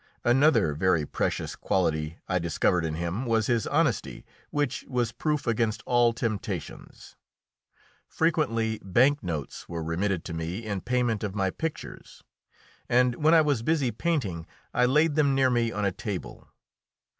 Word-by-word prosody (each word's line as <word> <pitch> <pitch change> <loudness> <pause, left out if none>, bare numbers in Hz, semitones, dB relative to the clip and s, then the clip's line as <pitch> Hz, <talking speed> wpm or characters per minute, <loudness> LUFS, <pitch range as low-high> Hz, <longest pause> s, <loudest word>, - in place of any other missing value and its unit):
Another 130 - +4
very 80 0 +1
precious - - -2
quality 80 -3 -1
I 90 -1 +1
discovered 85 +1 +1
in 80 -1 -2
him 85 +8 -3
was 110 -2 +2
his 115 -2 0
honesty, - - 0 0.2
which 145 -4 -1
was 120 -3 -1
proof 150 +1 -2
against 115 -1 0
all 120 -1 +4
temptations. 115 -3 -5 0.9
Frequently 115 -9 0
bank 130 +10 +3
notes 80 -6 -5
were 85 -1 -4
remitted 85 +2 -1
to 85 - -5
me 85 +7 -4
in 100 -3 -3
payment 120 -3 0
of 100 -2 -3
my 95 -2 0
pictures, 160 +7 -7 0.7
and 125 0 +4
when 160 +2 +6
I 160 - +7
was 145 -6 +1
busy 140 -2 +1
painting 105 - -2 0.3
I 125 - +3
laid 150 +4 +3
them 145 -2 +2
near 130 -1 +3
me 120 -1 +1
on 105 -2 -2
a 100 - +2
table. 100 0 -6
115 Hz, 150 wpm, -27 LUFS, 90-130 Hz, 0.9 s, I